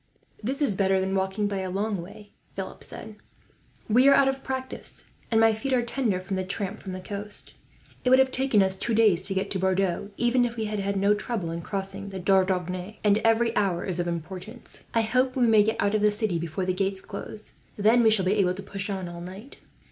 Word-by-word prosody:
"This 270 +7 -1
is 235 - +2
better 190 0 +2
than 190 0 -1
walking, 190 +2 0
by 200 -1 -2
a 190 -1 -3
long 200 0 -1
way," 205 +4 -12 0.2
Philip 190 -1 -6
said. 215 -1 -9 0.7
"We 245 +5 +5
are 280 - +8
out 275 - +5
of 270 0 -1
practice, 260 0 -3 0.2
and 225 - +3
my 225 0 +5
feet 265 +5 -2
are 245 -2 +3
tender 235 -6 0
from 190 +1 -4
the 185 - -1
tramp 195 +2 -2
from 190 - -6
the 185 - -5
coast. 205 +2 -7 0.5
It 250 - +2
would 260 - +7
have 265 0 +4
taken 260 -6 +3
us 190 0 0
two 225 +4 -2
days 210 -6 +4
to 195 +1 -4
get 195 +1 -1
to 190 - -1
Bordeaux, 190 0 0
even 245 +1 +3
if 240 -1 -1
we 220 -2 -2
had 200 -2 -2
no 200 +2 +4
trouble 210 -5 -3
in 170 0 -4
crossing 195 +1 -4
the 195 - -6
Dordogne, 185 +1 +1
and 210 0 +4
every 225 +1 +2
hour 190 -4 +1
is 180 -2 -1
of 175 - 0
importance. 180 +7 -6
I 230 - +2
hope 255 +3 +1
we 250 -2 +3
may 220 -2 +6
get 220 +2 +1
out 200 +1 +1
of 215 - +2
the 210 - +5
city 210 -4 -1
before 170 +3 -3
the 185 - 0
gates 195 +1 -1
close, 210 +2 -9 0.2
then 220 +4 +4
we 225 - +6
shall 210 -4 +2
be 190 - +3
able 180 -2 +2
to 195 - -7
push 200 +1 -5
on 190 -2 -3
all 170 0 -8
night." 190 - -9
200 Hz, 230 wpm, -26 LUFS, 190-225 Hz, 0.7 s, are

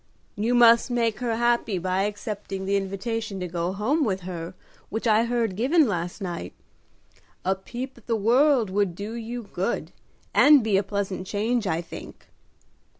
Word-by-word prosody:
"You 225 +4 +1
must 235 0 +6
make 230 -3 0
her 240 -2 -1
happy 235 -3 +1
by 185 +2 0
accepting 205 -2 -5
the 200 +1 +1
invitation 200 +1 -3
to 180 - -3
go 170 +1 -2
home 225 +11 +1
with 190 -6 -1
her 175 -1 -6 0.3
which 220 +2 -4
I 220 0 +4
heard 235 -4 0
given 280 - +3
last 175 0 -3
night. 170 - -5 0.9
A 190 - +3
peep 240 +7 -7
at 230 - -26
the 230 - +1
world 240 +1 +3
would 195 -3 0
do 205 +4 -6
you 235 +1 -5
good, 190 +6 -2 0.4
and 290 -4 +7
be 215 -3 +1
a 195 - +4
pleasant 195 -2 -3
change, 220 +2 0
I 160 -1 0
think." 170 - -10
210 Hz, 165 wpm, -25 LUFS, 190-235 Hz, 0.9 s, and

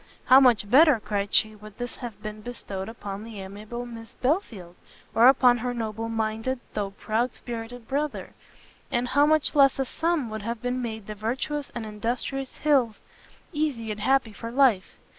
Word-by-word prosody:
"How 260 +1 +8
much 240 -6 +4
better," 280 +2 +6
cried 205 -1 -2
she, 215 0 +4
"would 210 -1 -13
this 245 -1 -6
have 240 -5 -7
been 215 0 -6
bestowed 205 -4 -6
upon 205 -3 -7
the 225 -2 -9
amiable 210 +5 -7
Miss 230 -1 -10
Belfield! 235 - -2 0.4
or 230 +2 +6
upon 250 -2 +5
her 245 +1 -2
noble 225 0 -3
minded, 225 +3 -2
though 205 -2 -2
proud 220 +4 -2
spirited 235 0 -7
brother! 290 +2 -3 0.6
and 245 +1 0
how 285 +2 +4
much 310 -1 +2
less 275 -3 +5
a 270 - 0
sum 320 -4 -1
would 215 0 -4
have 230 +2 -5
made 240 -4 -3
the 215 - -6
virtuous 260 +7 -3
and 235 -2 -4
industrious 240 +5 -3
Hills 265 -7 +2 0.5
easy 280 -8 -1
and 210 - -5
happy 250 0 +2
for 230 +2 -7
life! 240 -6 +2
235 Hz, 170 wpm, -26 LUFS, 215-260 Hz, 0.6 s, How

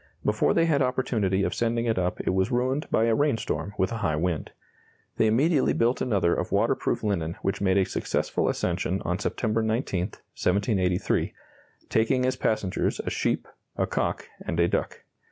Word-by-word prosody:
Before 105 0 +2
they 165 - +4
had 150 -4 +2
opportunity 115 -7 +1
of - - 0
sending 115 0 0
it 115 -5 +1
up 90 0 -1
it - - 0
was 95 0 +1
ruined 130 +4 0
by 110 - +2
a 115 0 +3
rainstorm 115 -6 0
with 95 +3 +1
a 115 - -2
high 90 -8 0
wind. 85 0 -1 0.7
They 110 - +4
immediately 140 +6 +3
built 120 +2 +1
another 100 -8 +2
of - - -2
waterproof - - +1
linen 85 -6 -1
which 95 +1 -1
made 95 -1 +3
a 95 - +4
successful - - -1
ascension 95 +2 -1
on 90 +1 -1
September 110 +1 0
19, 110 -5 0
1783, 95 -2 0 0.6
taking 125 +3 +2
as 130 - +1
passengers 105 -4 0
a - - -4
sheep, - - -1 0.3
a - - +2
cock, - - -2 0.2
and 85 - -3
a 85 - +4
duck. - - -2
110 Hz, 170 wpm, -26 LUFS, 95-120 Hz, 0.7 s, they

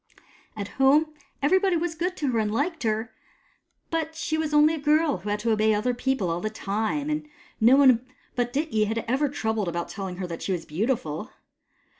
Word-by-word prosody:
At 200 -1 -3
home, 300 +4 +4 0.3
everybody 375 +4 +3
was 335 0 -2
good 355 +3 -2
to 285 -4 0
her 230 - +1
and 210 -1 0
liked 310 +9 -1
her, 220 +1 -1 0.8
but 320 -1 -2
she 315 0 -2
was 315 -1 -1
only 300 +1 +5
a 320 - -3
girl 300 0 +2
who 195 +4 -6
had 205 - +1
to 230 +1 +1
obey 215 0 +3
other 240 +4 0
people 245 -7 -1
all 170 +1 -2
the 215 - -1
time, 220 +7 -2
and 300 0 -2 0.3
no 235 +4 +6
one 260 -4 +5 0.3
but 245 -1 0
Dityi 270 -6 0
had 225 +2 -2
ever 270 +4 +1
troubled 220 -7 -1
about 170 0 -3
telling 190 -3 -5
her 185 - -3
that 170 -2 -6
she 190 - -1
was 170 -2 -4
beautiful. 205 - -2
245 Hz, 200 wpm, -26 LUFS, 215-300 Hz, 0.8 s, no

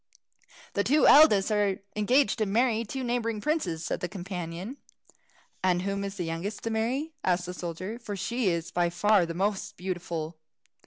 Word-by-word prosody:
"The 200 - +1
two 290 +7 +4
eldest 225 -10 +7
are 205 -2 +2 0.2
engaged 245 +5 +2
to 215 - +1
marry 230 +2 +2
two 260 +4 -5
neighbouring 235 -3 -1
princes," 195 - -1
said - - -2
the 180 - -3
companion. 180 +4 -6 0.9
"And 180 -1 +2
whom 200 0 -2
is 200 0 -4
the 180 - -3
youngest 165 +6 -4
to 230 - -2
marry?" 255 +8 -1
asked 175 -1 +1
the 180 - -5
soldier, 180 +6 -5
"for 210 -4 -5
she 235 +2 0
is 170 -1 -2
by 175 -1 +1
far 195 +1 +3
the 165 - -5
most 205 +2 -1
beautiful." 170 -3 -4
200 Hz, 170 wpm, -28 LUFS, 175-230 Hz, 0.9 s, eldest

